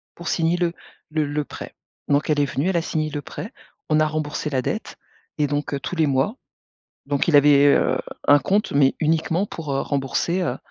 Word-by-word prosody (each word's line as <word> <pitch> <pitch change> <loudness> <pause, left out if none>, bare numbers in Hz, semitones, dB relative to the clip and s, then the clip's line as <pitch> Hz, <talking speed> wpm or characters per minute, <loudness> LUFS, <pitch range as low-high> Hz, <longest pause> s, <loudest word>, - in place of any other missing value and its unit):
pour 170 - -9
signer 170 +1 +1
le 175 -1 0 0.4
le 155 -1 0
le 145 +1 -2
prêt.». - - -9 0.3
Donc, 145 +2 +1
elle 150 -1 +2
est 145 - +3
venue, 140 +5 -1
elle 185 - +1
a 170 - +2
signé 155 -1 -2
le 145 -1 -4
prêt. - - -8 0.4
On 155 0 +3
a 155 - +3
remboursé 150 0 -3
la 130 -3 0
dette - - -4 0.4
et 150 - +2
donc, 145 0 -2
heu, 140 - -1
tous 180 - -5
les 160 -2 +2
mois. 140 - +1 0.7
Donc, 140 0 0
il 165 - +4
avait, 145 0 +6
heu, - - +3 0.3
un 145 0 +7
compte 200 +9 0
mais 140 -1 +4
uniquement 165 +4 +1
pour, 160 -7 -6
heu, 135 - 0
rembourser, 145 +6 -1
heu 135 -8 -1
150 Hz, 215 wpm, -22 LUFS, 145-165 Hz, 0.7 s, un